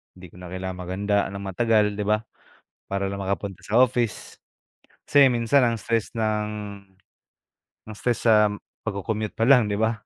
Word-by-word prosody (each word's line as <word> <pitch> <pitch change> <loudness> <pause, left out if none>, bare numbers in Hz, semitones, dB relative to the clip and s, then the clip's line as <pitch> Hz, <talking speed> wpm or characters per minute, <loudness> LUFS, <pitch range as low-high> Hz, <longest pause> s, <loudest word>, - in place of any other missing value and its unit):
Hindi 90 -1 -12
ko - - -20
na 90 - -10
kailangang 95 0 -6
maghanda 100 +3 -1
nang 100 0 -7
matagal, 105 +1 +1
di 105 - -2
ba? 105 0 +2 0.6
Para 100 0 -2
lang 100 0 -5
makapunta 100 0 -4
sa 115 +4 +2
office. 120 -3 0 0.7
Kasi 145 -2 +6
minsan 120 +3 +3
ang 115 - 0
stress 115 0 -1
ng 110 -2 0 1.4
mas 110 -1 -10
stress 120 -2 -1
sa 105 -2 +6 0.4
pagco-commute 105 +2 -3
palang, 120 -1 +4
di 100 - -1
ba? 110 +1 +2
105 Hz, 155 wpm, -24 LUFS, 100-115 Hz, 1.4 s, Kasi